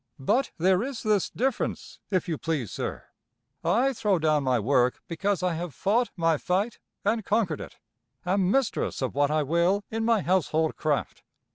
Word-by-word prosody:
But 215 - +1
there 185 +3 +3
is 260 -1 -4
this 210 -3 +2
difference, 265 +3 -2
if 185 -4 0
you 160 -4 -2
please, 150 - -2
sir; - - -4 0.6
I 265 +4 +2
throw 210 -5 +1
down 155 -2 +2
my 130 -2 +2
work 125 +2 +2
because 190 +2 -1
I 180 -2 +1
have 165 -4 -5
fought 230 - +1
my 165 -2 +2
fight 200 +6 -1 0.3
and 220 +2 +1
conquered 200 -7 0
it, - - -10 0.5
am 185 0 +2
mistress 255 - 0
of 130 - -2
what 145 0 +2
I 155 0 +1
will 170 +7 +2
in 225 0 -1
my 225 -2 +3
household 160 -3 +1
craft. 150 -2 -1
180 Hz, 170 wpm, -27 LUFS, 155-215 Hz, 0.6 s, there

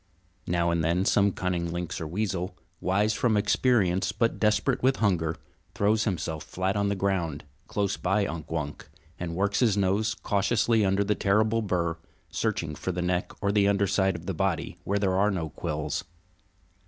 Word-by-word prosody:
Now 85 0 +1
and 85 -1 +1
then 85 +4 +1
some 100 0 +4
cunning 90 -2 -2
lynx 85 -1 -4
or 80 - -3
weasel, 95 0 -2 0.2
wise 100 +4 +1
from 110 0 +2
experience 100 -4 +2
but 115 +3 0
desperate 110 +5 +2
with 130 +1 +3
hunger, 85 -7 +1 0.4
throws 105 +2 +2
himself 80 -6 -2
flat 95 +2 -2
on 100 0 +1
the 100 - 0
ground, 90 -6 -1 0.2
close 100 -2 -1
by 100 +3 +1
Unk 80 -3 -5
Wunk, 75 -3 -4 0.3
and 85 -1 -4
works 100 +2 +1
his 110 -5 +3
nose 100 +3 +1
cautiously 110 +2 +1
under 95 +1 +2
the 105 +1 +1
terrible 110 +3 +2
bur, 90 -5 -1 0.3
searching 100 -9 -1
for 95 - -3
the 90 0 -2
neck 90 0 -1
or 100 - +2
the 100 -1 +3
underside 100 -1 +2
of 85 0 -8
the 95 - -2
body, 80 - -2
where 100 - +1
there 95 -2 +1
are 100 +3 +3
no 85 -6 -2
quills. 80 0 -3
95 Hz, 175 wpm, -27 LUFS, 85-105 Hz, 0.4 s, some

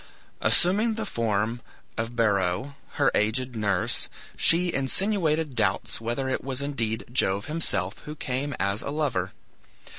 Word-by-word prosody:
Assuming 210 +6 +3
the 220 0 -3
form 115 - -1 0.3
of 115 +1 -3
Beroe, 100 +2 +1 0.2
her - - +2
aged 125 +4 0
nurse, 100 -4 0 0.3
she 175 +1 +3
insinuated 160 0 +1
doubts 105 0 0
whether 120 +4 -2
it 130 - -2
was 135 -1 -2
indeed 115 -6 -2
Jove 100 -5 +1
himself 105 - +1
who 150 - -8
came 135 0 -3
as 100 +3 0
a - - -4
lover. 140 -11 -1
125 Hz, 130 wpm, -26 LUFS, 105-150 Hz, 0.3 s, Assuming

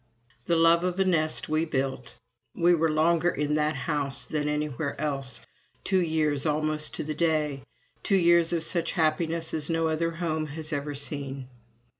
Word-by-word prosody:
The 170 - +3
love 165 +1 +5
of 180 +1 -1
a 190 - +3
nest 155 -4 +1
we 155 +1 +1
built! 135 -5 -3 0.4
We 175 0 +4
were 165 -1 +2
longer 165 +2 +3
in 150 -2 -1
that 150 0 +1
house 140 +1 -2
than 150 -1 -2
anywhere 150 -4 -2
else: 140 -3 -3 0.4
two 190 -1 +2
years 155 -4 0
almost 155 0 -1
to - - -3
the 155 +1 -3
day 150 -4 0 0.4
two 195 - +2
years 170 -2 +4
of 170 -2 0
such 170 0 -1
happiness 160 0 0
as 155 0 -1
no 165 -1 +1
other 165 +1 0
home 160 -2 -2
has 155 +1 -6
ever 145 0 -3
seen. 140 -2 -5
155 Hz, 170 wpm, -27 LUFS, 150-165 Hz, 0.4 s, love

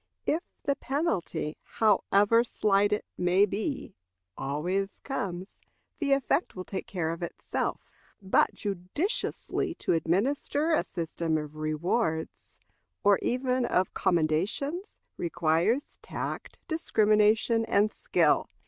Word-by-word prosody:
If 320 - +1 0.2
the 280 - +1
penalty, 270 - -2
however 210 +1 +3
slight 205 -3 +2
it 210 - 0
may 180 +3 +4
be, 215 +8 -3 0.4
always 175 +9 -2
comes, 190 -8 -4 0.4
the 285 -4 +2
effect 275 +5 +1
will 185 - -5
take 190 - -5
care 165 -4 -2
of 165 - -6
itself. 170 - -3 0.4
But 190 -2 +2
judiciously 210 - -2
to - - 0
administer 265 - +1
a 305 - +3
system 165 -1 -2
of 150 0 -6
rewards, 160 +2 -2 0.5
or 200 -1 +5
even 255 0 0
of 185 -5 +1
commendations, 190 - 0 0.2
requires 175 - 0
tact, - - -5
discrimination, 220 -6 +3
and 210 0 +2
skill. - - +2
200 Hz, 110 wpm, -28 LUFS, 170-250 Hz, 0.5 s, or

